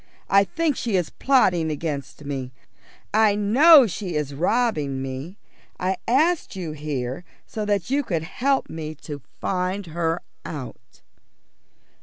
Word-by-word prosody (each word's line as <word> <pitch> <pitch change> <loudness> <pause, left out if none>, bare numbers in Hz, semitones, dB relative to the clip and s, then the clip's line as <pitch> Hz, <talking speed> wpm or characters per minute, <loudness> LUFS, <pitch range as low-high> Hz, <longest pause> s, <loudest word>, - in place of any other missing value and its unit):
I 195 0 +6
think 300 - 0
she 230 -5 -1
is 180 -3 0
plotting 180 -12 +3
against 150 -1 -4
me; 135 -3 -4 0.6
I 215 -1 +4
know 265 +8 +7
she 185 -3 -4
is 150 -2 -2
robbing 160 - 0
me. 135 +8 -6 0.4
I 185 +1 0
asked 310 - +2
you 175 -4 -4
here 145 -1 -4 0.2
so 215 -1 -4
that 205 +1 -1
you 285 +1 +3
could 170 - -2
help 270 +10 0
me 155 -1 -6
to 145 -1 -8 0.2
find 185 +1 -1
her 165 0 -2 0.2
out." 140 -5 -9
180 Hz, 135 wpm, -24 LUFS, 150-220 Hz, 0.6 s, know